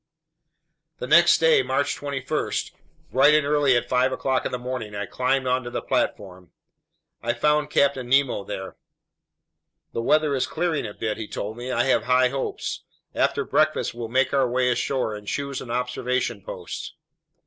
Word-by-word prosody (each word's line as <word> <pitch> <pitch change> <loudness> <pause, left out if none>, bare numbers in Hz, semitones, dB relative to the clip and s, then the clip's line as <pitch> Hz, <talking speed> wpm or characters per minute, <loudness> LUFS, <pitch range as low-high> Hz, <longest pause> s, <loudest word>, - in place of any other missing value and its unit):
The - - -5
next - - +6
day, 480 -3 +4
March 145 - 0
21, 140 -2 -3 0.6
bright 145 +3 +5
and 150 -1 +3
early 145 -3 +3
at 120 - -2
five 130 +1 +2
o'clock 130 0 0
in - - -8
the 125 - -2
morning, 125 -4 -5
I 105 0 -3
climbed 130 +5 0
onto 125 -1 0
the - - -3
platform. 90 -3 -2 0.7
I 120 0 0
found 150 +4 +1
Captain 135 -4 +1
Nemo 135 -6 +2
there. 95 0 -7 1.2
"The 115 - -2
weather 150 +4 +2
is 130 - 0
clearing 170 -4 -1
a 105 - -9
bit," 110 -1 -3
he 110 -2 -5
told 105 +2 -5
me. 120 +2 -6
"I - - +2
have 135 - +2
high 125 0 +4
hopes. 135 +1 -4 0.3
After - - +1
breakfast - - +1
we'll 120 -1 -5
make 130 +4 +1
our 135 -3 +2
way 125 0 +2
ashore 125 -1 -1
and 105 -1 -9
choose 140 +4 -3
an 120 - -9
observation 125 -2 -2
post." - - -7
125 Hz, 170 wpm, -24 LUFS, 120-140 Hz, 1.2 s, next